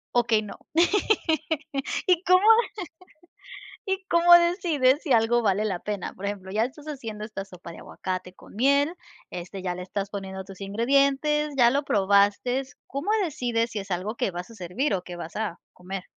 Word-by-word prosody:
Okey, 230 Hz, -3 st, +3 dB
no, 205 Hz, -2 st, -8 dB, 1.5 s
¿y 360 Hz, 0 st, +3 dB
cómo 365 Hz, -1 st, +5 dB, 1.4 s
y 385 Hz, 0 st, -2 dB
cómo 345 Hz, +1 st, +6 dB
decides 335 Hz, -6 st, +3 dB
si 280 Hz, -, 0 dB
algo 230 Hz, +1 st, +3 dB
vale 210 Hz, -1 st, +1 dB
la 185 Hz, -4 st, -2 dB
pena?, 205 Hz, -3 st, -4 dB
por 195 Hz, -, -8 dB
ejemplo, 195 Hz, -2 st, -5 dB
ya 220 Hz, +3 st, +1 dB
estás 295 Hz, +4 st, -10 dB
haciendo 225 Hz, -8 st, -6 dB
esta 215 Hz, -2 st, -6 dB
sopa 180 Hz, -3 st, -11 dB
de -, -, -11 dB
aguacate 185 Hz, 0 st, -5 dB
con -, -, -17 dB
miel, 280 Hz, +6 st, +3 dB, 0.4 s
este, 180 Hz, +2 st, -7 dB
ya 180 Hz, -1 st, -2 dB
le 180 Hz, -, -6 dB
estás 195 Hz, +1 st, -4 dB
poniendo 190 Hz, -1 st, -6 dB
tus 195 Hz, 0 st, -12 dB
ingredientes, 275 Hz, +7 st, +1 dB
ya 240 Hz, -1 st, +6 dB
lo 280 Hz, +1 st, +1 dB
probaste, 205 Hz, +6 st, +2 dB, 0.2 s
¿cómo 280 Hz, +10 st, -3 dB
decides 240 Hz, -7 st, -1 dB
si 210 Hz, -, -3 dB
es 195 Hz, 0 st, -8 dB
algo 195 Hz, +6 st, -2 dB
que 195 Hz, -, -1 dB
vas 175 Hz, +4 st, -7 dB
a -, -, -13 dB
servir 190 Hz, -, -2 dB
o 185 Hz, -, 0 dB
que 175 Hz, -1 st, -8 dB
vas 170 Hz, +3 st, -7 dB
a 210 Hz, -6 st, -3 dB
comer? 185 Hz, +1 st, -7 dB
215 Hz, 175 wpm, -26 LUFS, 190-275 Hz, 1.5 s, cómo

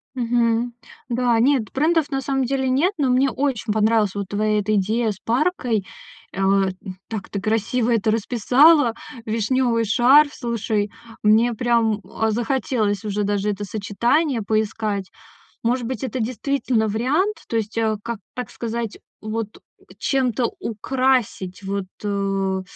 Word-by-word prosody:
Мгм. 235 Hz, -1 st, +1 dB, 0.4 s
Да, 240 Hz, -1 st, +2 dB
нет, 250 Hz, -3 st, +2 dB
брендов 310 Hz, +1 st, +2 dB
на 270 Hz, -, 0 dB
самом 270 Hz, 0 st, 0 dB
деле 265 Hz, +1 st, 0 dB
нет, 300 Hz, +10 st, +2 dB
но 280 Hz, -4 st, +1 dB
мне 260 Hz, +2 st, +3 dB
очень 260 Hz, -5 st, -1 dB
понравилась 215 Hz, -2 st, +2 dB
вот 200 Hz, -1 st, -3 dB
твоя 210 Hz, +1 st, +1 dB
эта 215 Hz, +1 st, 0 dB
идея 220 Hz, +3 st, +1 dB
с 195 Hz, -, -9 dB
паркой. 240 Hz, -, 0 dB, 0.5 s
А, 195 Hz, 0 st, +2 dB
э, -, -, -3 dB, 0.4 s
так 215 Hz, -4 st, -6 dB
ты 200 Hz, -, -3 dB
красиво 225 Hz, +3 st, 0 dB
это 225 Hz, -1 st, +2 dB
расписала. 245 Hz, +5 st, +4 dB, 0.3 s
Вишнёвый 230 Hz, +1 st, +1 dB
шарф, 270 Hz, +7 st, +5 dB
слушай, 220 Hz, -4 st, -2 dB, 0.3 s
мне 220 Hz, +3 st, +4 dB
прям, 230 Hz, -2 st, +1 dB
а, 220 Hz, 0 st, -1 dB
захотелось 225 Hz, -3 st, -1 dB
уже 210 Hz, 0 st, -1 dB
даже 205 Hz, 0 st, 0 dB
это 205 Hz, 0 st, -5 dB
сочетание 225 Hz, -, 0 dB
поискать. 210 Hz, -2 st, -1 dB, 0.5 s
Может 240 Hz, +1 st, 0 dB
быть, 250 Hz, -1 st, -4 dB
это 260 Hz, 0 st, -3 dB
действительно 245 Hz, -1 st, 0 dB
вариант? 290 Hz, -, 0 dB
То -, -, -4 dB
есть, 220 Hz, 0 st, -3 dB
э, 220 Hz, -1 st, +1 dB
как, 235 Hz, -1 st, -4 dB, 0.2 s
так 250 Hz, -3 st, -5 dB
сказать, 230 Hz, -1 st, -4 dB, 0.2 s
вот, 215 Hz, 0 st, -4 dB, 0.2 s
у, -, -, -26 dB
чем-то 255 Hz, -3 st, 0 dB
украсить 230 Hz, -5 st, -1 dB
вот, 195 Hz, 0 st, -3 dB, 0.2 s
э. 195 Hz, -2 st, -1 dB
230 Hz, 140 wpm, -22 LUFS, 210-255 Hz, 0.5 s, шарф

